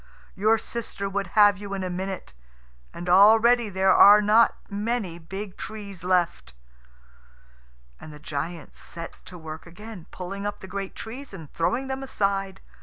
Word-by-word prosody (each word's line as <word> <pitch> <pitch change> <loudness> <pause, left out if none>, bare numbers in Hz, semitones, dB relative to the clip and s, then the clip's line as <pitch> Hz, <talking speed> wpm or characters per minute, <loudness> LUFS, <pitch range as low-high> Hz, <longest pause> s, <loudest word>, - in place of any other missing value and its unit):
Your 215 +3 +3
sister 220 -3 -5
would 195 0 -2
have 205 -2 +6
you 200 -1 -5
in 190 - -4
a 185 - -3
minute. 190 +1 -5 0.6
And 175 - -8
already 220 +5 +6
there 190 0 +3
are 205 +1 +9
not 215 +2 +4
many 205 -4 -3
big 190 +4 -7
trees 200 -4 -8
left." 175 - 0 1.4
And 155 - -11
the 150 - -11
giant 155 +2 -6
set 170 -1 -9
to 180 - -10
work 160 0 -9
again, 190 +1 -11
pulling 195 +2 -6
up 205 - -5
the - - -8
great 195 0 -5
trees 255 +5 -8
and 155 -3 -11
throwing 240 +11 0
them 265 0 -4
aside. 195 -6 -2
195 Hz, 155 wpm, -25 LUFS, 180-215 Hz, 1.4 s, are